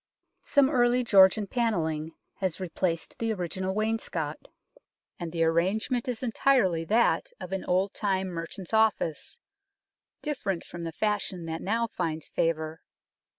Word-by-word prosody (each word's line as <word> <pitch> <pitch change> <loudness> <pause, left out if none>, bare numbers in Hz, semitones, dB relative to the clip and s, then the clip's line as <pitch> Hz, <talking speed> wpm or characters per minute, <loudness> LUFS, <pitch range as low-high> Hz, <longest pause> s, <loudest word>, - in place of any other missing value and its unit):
Some 280 -2 +4
early 245 -2 +3
Georgian 200 -2 +6
panelling 165 -9 -1 0.2
has 185 -3 -2
replaced 175 -2 -2
the 225 -1 0
original 185 0 -3
wainscot, 220 +2 -2 0.7
and 170 -2 -4
the 165 0 +1
arrangement 190 +10 +1
is 245 -1 -3
entirely 230 -8 +2
that 235 - +2
of 180 - -7
an 195 -1 -2
old 190 +2 +1
time 190 -2 0
merchant's 170 +3 -6
office, 220 -8 +1 0.9
different 225 - -2
from 170 -1 -7
the 165 - -3
fashion 200 -3 -2
that 165 0 -4
now 230 +4 +1
finds 165 -7 -3
favour. 160 -1 -1
190 Hz, 130 wpm, -28 LUFS, 165-225 Hz, 0.9 s, Georgian